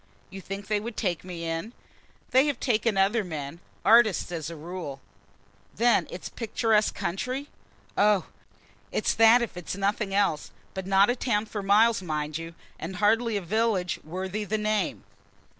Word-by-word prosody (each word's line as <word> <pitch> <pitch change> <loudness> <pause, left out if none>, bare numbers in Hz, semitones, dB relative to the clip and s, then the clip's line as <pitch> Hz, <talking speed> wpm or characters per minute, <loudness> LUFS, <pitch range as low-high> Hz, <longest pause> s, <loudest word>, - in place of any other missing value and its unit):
"You 195 0 -8
think 195 +1 -6
they 210 +1 0
would 225 +2 -7
take 180 -6 -1
me 175 -2 -6
in?" 165 +8 -3 0.6
"They 265 +3 +5
have 290 - -1
taken 225 -4 +1
other 205 +4 +3
men 155 -3 -6 0.3
artists 220 -5 +5
as 160 -3 -4
a 170 - -7
rule." 160 -3 -6 0.8
"Then 240 +1 +3
it's 180 - -7
a - - -12
picturesque 220 -1 +1
country?" 255 +10 -3 0.5
"Oh, 205 -2 +3 0.7
it's - - +1
that 230 +2 +6
if 230 - -5
it's 180 0 -5
nothing 200 +1 -1
else; 195 -6 +1 0.2
but 190 -1 -5
not 195 +3 +5
a - - -1
town 220 -4 0
for 210 -1 -5
miles, 215 +3 +4
mind 155 -2 -3
you, 165 0 -8 0.2
and 170 +4 -5
hardly 220 +3 +2
a 200 - -4
village 200 -2 0
worthy 190 +5 -4
the 215 +1 -1
name." 215 0 -1
200 Hz, 165 wpm, -27 LUFS, 180-225 Hz, 0.8 s, that